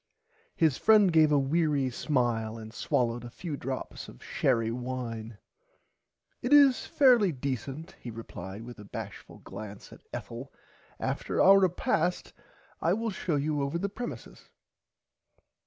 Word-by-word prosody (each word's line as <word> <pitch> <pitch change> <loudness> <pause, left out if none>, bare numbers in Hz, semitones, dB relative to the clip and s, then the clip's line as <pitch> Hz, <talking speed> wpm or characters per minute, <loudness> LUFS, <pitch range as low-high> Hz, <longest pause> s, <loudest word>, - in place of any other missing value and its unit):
His 155 -6 +2
friend 210 -5 +5
gave 155 -2 +5
a 145 - +5
weary 140 -1 +1
smile 120 -5 0
and 110 0 -9
swollowed 120 -2 0
a 120 - -7
few 155 +5 -5
drops 130 -1 -5
of - - -14
sherry 115 -4 +1
wine. 120 -3 -5 1.0
It 245 - -2
is 280 -3 +6
fairly 245 - +5
decent 140 - -4
he 120 - -8
replied 110 -3 -8
with 120 -1 -10
a - - -9
bashful 100 - -8
glance 105 -2 -9
at - - -15
Ethel 120 +4 -7 0.5
after - - -2
our 195 +1 +8
repast 180 -1 0 0.5
I 170 - +3
will 225 +2 -1
show 180 -4 -2
you 145 +1 0
over 140 +4 -1
the 200 +3 -2
premisis. 240 +4 -8
140 Hz, 140 wpm, -29 LUFS, 115-175 Hz, 1.0 s, our